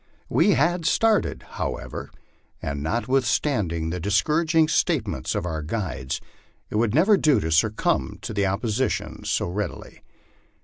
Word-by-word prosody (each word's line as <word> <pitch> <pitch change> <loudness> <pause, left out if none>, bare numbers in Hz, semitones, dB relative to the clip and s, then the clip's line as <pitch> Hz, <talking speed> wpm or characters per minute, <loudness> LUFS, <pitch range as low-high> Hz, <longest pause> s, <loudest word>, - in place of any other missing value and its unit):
We 205 - +4
had 170 +2 +1
started, 220 +6 +2
however, - - -5 0.5
and 70 0 -4
notwithstanding 115 - 0
the 90 - -3
discouraging 155 - +2
statements 160 - 0
of - - -1
our 80 -3 -3
guides 80 -6 -3 0.5
it - - -1
would 115 +1 +1
never 195 +7 +5
do 150 -6 +3
to 80 - -2
succumb 75 -4 +1
to 100 -2 -1
opposition 110 +5 -1
so - - 0
readily. 100 +4 -5
110 Hz, 125 wpm, -24 LUFS, -, 0.5 s, never